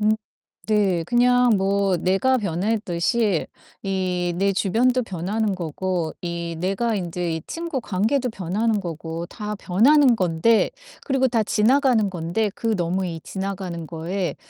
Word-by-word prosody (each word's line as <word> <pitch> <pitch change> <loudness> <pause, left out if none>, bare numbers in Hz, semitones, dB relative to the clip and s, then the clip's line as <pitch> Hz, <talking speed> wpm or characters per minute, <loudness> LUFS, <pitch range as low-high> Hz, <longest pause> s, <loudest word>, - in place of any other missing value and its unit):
음 210 0 +3 0.6
네. 200 -5 +2
그냥 245 +3 +4
뭐 195 -1 +1
내가 195 +10 +2
변했듯이 200 0 0 0.4
이 190 -2 -1 0.2
내 195 +1 +2
주변도 240 +6 +2
변하는 200 +1 -2
거고 175 0 -2
이 170 -1 -4
내가 195 +6 0
인제 175 -3 -2
이 160 - -6
친구 330 -5 -4
관계도 235 +6 0
변하는 210 +3 -1
거고 165 -1 -5
다 210 +2 -5
변하는 245 +9 +4
건데 185 +4 +2 0.3
그리고 270 -2 +2
다 235 -3 +1
지나가는 230 +1 +3
건데 180 +4 -1
그 225 -2 -1
너무 180 +2 -1
이 165 -2 -5
지나가는 190 -4 -5
거에 170 +3 -3
195 Hz, 260 characters per minute, -23 LUFS, 175-225 Hz, 0.6 s, 그냥